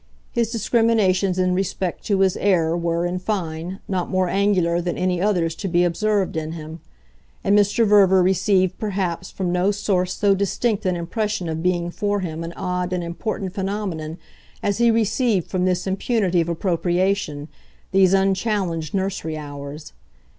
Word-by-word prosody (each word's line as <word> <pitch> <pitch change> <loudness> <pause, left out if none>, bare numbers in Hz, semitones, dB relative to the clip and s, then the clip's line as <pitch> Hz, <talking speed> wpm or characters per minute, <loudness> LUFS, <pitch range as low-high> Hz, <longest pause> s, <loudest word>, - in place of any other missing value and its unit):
His 235 -2 0
discriminations 215 -5 +2
in 185 0 +2
respect 185 -1 -2
to 200 -2 +2
his 190 -2 +3
heir 170 -5 +2
were, 170 0 0
in 180 +1 -2
fine, 180 -2 -3
not 185 -2 -2
more 185 -1 +1
angular 180 -3 +2
than 175 0 -3
any 180 -1 0
others 180 -5 +1
to 200 - -3
be 175 -1 +2
observed 195 +2 0
in 160 0 -3
him; 160 0 -8 0.6
and 200 - +3
Mr. 210 +3 +3
Verver 195 -3 +5
received 185 0 +2
perhaps 185 -4 -2
from 185 -2 -3
no 180 +2 +2
source 185 -3 0
so 200 -1 +3
distinct 200 +2 0
an 180 - +1
impression 185 +2 -2
of 160 0 -3
being 175 -1 0
for 205 +2 -1
him 165 -2 -4
an 165 - -5
odd 180 -1 -2
and 180 -1 -1
important 185 +2 -4
phenomenon 190 -5 -3 0.5
as 200 +1 0
he 235 0 +5
received 225 -3 +1
from 185 -1 0
this 180 -1 0
impunity 190 -2 +1
of 165 - -2
appropriation, 175 -2 0 0.4
these 190 -1 +5
unchallenged 190 -4 0
nursery 190 -5 -2
hours. 145 0 -8
185 Hz, 160 wpm, -22 LUFS, 170-200 Hz, 0.6 s, Verver